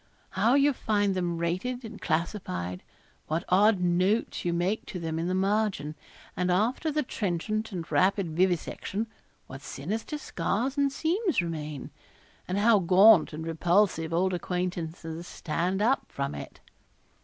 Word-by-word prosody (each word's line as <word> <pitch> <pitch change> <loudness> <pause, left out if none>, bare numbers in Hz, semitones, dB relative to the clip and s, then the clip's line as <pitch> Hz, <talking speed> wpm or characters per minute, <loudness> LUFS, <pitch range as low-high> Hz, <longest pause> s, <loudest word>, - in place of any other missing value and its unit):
How 240 +4 +3
you 285 0 +4
find 205 -5 +1
them 175 -2 -1
rated 185 +10 -2
and 220 -2 -9
classified 90 - -2 0.5
what 160 +3 -1
odd 205 +2 +5
notes 180 +5 +1
you 175 - 0
make 175 +5 -1
to 180 - -5
them 160 -1 -3
in 170 - -1
the 185 - 0
margin; 195 -6 0 0.4
and 180 0 0
after 230 - +1
the 300 0 0
trenchant 215 0 -2
and 175 -4 -4
rapid 190 -2 +2
vivisection, 185 +4 0 0.4
what 135 +1 -10
sinister 210 - -4
scars 265 -2 -2
and 280 -1 +2
seams 345 +5 0
remain, 155 -4 -4 0.6
and 185 - -1
how 215 +1 +5
gaunt 190 +1 +6
and 160 +1 -6
repulsive 165 0 +2
old 185 +3 +1
acquaintances 175 -2 -4
stand 180 +5 -1
up 260 +5 +2
from 140 +1 -3
it. - - -9
185 Hz, 145 wpm, -28 LUFS, 170-215 Hz, 0.6 s, gaunt